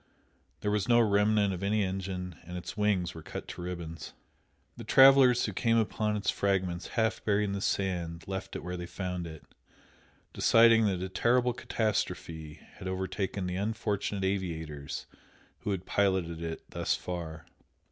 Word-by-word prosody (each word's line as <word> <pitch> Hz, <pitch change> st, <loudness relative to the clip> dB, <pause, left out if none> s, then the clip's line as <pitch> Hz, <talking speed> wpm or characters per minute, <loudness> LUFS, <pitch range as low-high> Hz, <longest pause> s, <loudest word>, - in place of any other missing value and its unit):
There 105 Hz, -, 0 dB
was 105 Hz, -2 st, 0 dB
no 120 Hz, 0 st, +6 dB
remnant 105 Hz, -2 st, +3 dB
of 90 Hz, -, -5 dB
any 105 Hz, +1 st, +1 dB
engine, 95 Hz, -2 st, -4 dB
and 90 Hz, +2 st, -7 dB
its 90 Hz, -, -6 dB
wings 100 Hz, -5 st, +1 dB
were 80 Hz, -, -9 dB
cut -, -, -7 dB
to -, -, -7 dB
ribbons. 85 Hz, -2 st, -6 dB, 0.6 s
The -, -, -8 dB
travellers 135 Hz, -2 st, +7 dB
who 105 Hz, -, -3 dB
came 115 Hz, +4 st, +2 dB
upon 105 Hz, -1 st, 0 dB
its 100 Hz, -, +1 dB
fragments 95 Hz, -3 st, 0 dB
half 110 Hz, -1 st, +1 dB
buried 105 Hz, 0 st, +2 dB
in 100 Hz, -, -1 dB
the 100 Hz, 0 st, -3 dB
sand 85 Hz, -5 st, -2 dB
left 95 Hz, 0 st, -5 dB
it -, -, -5 dB
where 90 Hz, +1 st, -4 dB
they 90 Hz, 0 st, -6 dB
found 90 Hz, -2 st, -4 dB
it, 80 Hz, -2 st, -10 dB, 0.9 s
deciding 115 Hz, -1 st, +6 dB
that 95 Hz, -2 st, -1 dB
a 95 Hz, -, -4 dB
terrible 120 Hz, +5 st, +2 dB
catastrophe 85 Hz, -10 st, -2 dB, 0.2 s
had 95 Hz, -, -6 dB
overtaken 95 Hz, +1 st, -2 dB
the 90 Hz, 0 st, -2 dB
unfortunate 105 Hz, -1 st, -2 dB
aviators 80 Hz, -7 st, -3 dB, 0.5 s
who -, -, -4 dB
had 95 Hz, -2 st, -2 dB
piloted 95 Hz, -5 st, +1 dB
it 80 Hz, -1 st, -5 dB
thus -, -, 0 dB
far. 85 Hz, -2 st, -6 dB
95 Hz, 160 wpm, -30 LUFS, 90-105 Hz, 0.9 s, travellers